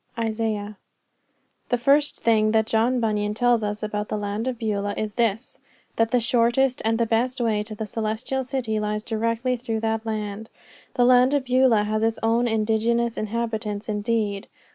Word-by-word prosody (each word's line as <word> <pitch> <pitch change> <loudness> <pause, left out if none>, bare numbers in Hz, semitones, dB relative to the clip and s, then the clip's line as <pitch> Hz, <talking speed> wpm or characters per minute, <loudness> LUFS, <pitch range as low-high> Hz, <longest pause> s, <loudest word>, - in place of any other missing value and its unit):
Isaiah. 215 -2 -2 0.9
The 245 - +2
first 280 +4 +2
thing 215 -1 +3
that 220 -1 +3
John 230 +3 +1
Bunyan 210 -2 -1
tells 245 0 +3
us 210 0 -3
about 210 0 -3
the 215 - -2
land 205 +3 -3
of 255 -2 -2
Beulah 205 -3 -2
is 215 -1 -3
this 230 0 -1 0.4
that 225 0 +2
the 245 - +2
shortest 240 +3 +2
and 225 +1 +1
the 235 - +2
best 245 +4 0
way 220 -3 +1
to 215 +1 -7
the 220 - -4
Celestial 225 +5 -2
City 250 -5 -2
lies 210 0 -2
directly 230 +3 -1
through 230 -2 -3
that 225 0 -1
land. 215 -1 -4 0.5
The 245 - +4
land 255 +2 +5
of 275 -2 0
Beulah 250 -4 +4
has 215 +1 -1
its 225 0 +1
own 230 +2 +2
indigenous 225 +1 +1
inhabitants 215 -1 -3
indeed. 210 -1 -1
225 Hz, 170 wpm, -24 LUFS, 215-235 Hz, 0.9 s, land